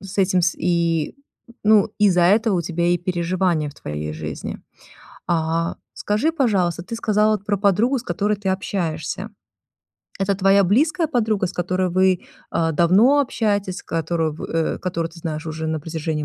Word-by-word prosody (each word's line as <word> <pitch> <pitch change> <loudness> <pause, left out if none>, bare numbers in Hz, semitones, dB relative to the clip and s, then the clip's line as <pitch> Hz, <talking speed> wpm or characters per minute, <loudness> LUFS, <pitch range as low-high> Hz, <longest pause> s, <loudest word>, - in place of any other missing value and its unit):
С 195 0 -9
этим 185 -2 +3
с 170 - +2
и 170 -2 0 0.5
Ну, 215 -1 +4
из-за 190 -4 +4
этого 205 +2 +3
у - - -1
тебя 170 +1 -1
и 175 0 +2
переживания 175 -3 0
в - - -18
твоей 75 +1 -5
жизни. 75 0 -6 0.7
А 165 0 0 0.2
скажи, 215 +11 0
пожалуйста, 195 - +1
ты 230 +6 -6
сказала 215 -2 +2
про 205 +1 -2
подругу, 210 +7 +2
с - - -7
которой 210 -3 -1
ты 195 -1 -4
общаешься. 190 +1 -3 0.9
Это 195 0 +1
твоя 195 +1 +4
близкая 300 - +2
подруга, 220 -8 +1
с - - -6
которой 185 +1 -1
вы, 185 0 +2 0.3
а, 165 -1 0
давно 200 - +4
общаетесь, 205 -7 -1
с - - -10
которую, 165 -1 -1
в - - -10
э, 165 -1 -1
которую 170 -2 -3
ты 165 - -14
знаешь 155 -1 -4
уже 160 0 -4
на 160 -1 -2
протяжении 155 -1 -3
185 Hz, 165 wpm, -21 LUFS, 165-205 Hz, 0.9 s, Ну